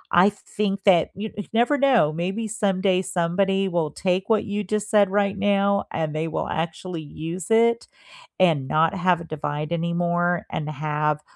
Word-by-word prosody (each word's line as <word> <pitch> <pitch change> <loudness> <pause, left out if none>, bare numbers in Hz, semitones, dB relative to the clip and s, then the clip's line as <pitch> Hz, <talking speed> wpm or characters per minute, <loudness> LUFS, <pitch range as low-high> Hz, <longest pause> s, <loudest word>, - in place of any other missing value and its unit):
I 180 +3 +6
think 200 -1 -4
that 180 -5 +4
you 210 +3 -5
you 205 - -5
never 240 +6 +3
know, 245 - +3
maybe 190 +7 -3
someday 195 -3 +1
somebody 190 +2 0
will 170 -4 -1
take 185 +3 -1
what 220 -2 +2
you 205 0 -3
just 210 +2 -3
said 205 -2 +5
right 200 0 +1
now, 200 0 +2
and 155 -1 -2
they 160 +1 -1
will 160 - -3
actually 165 +1 -4
use 165 +3 -6
it 230 +1 +3 0.5
and 160 -8 +3
not 160 +4 +2
have 180 -2 +1
a - - -6
divide 150 -1 -4
anymore 170 +1 0
and 155 -1 -3
have 150 0 -1
185 Hz, 170 wpm, -23 LUFS, 165-200 Hz, 0.5 s, I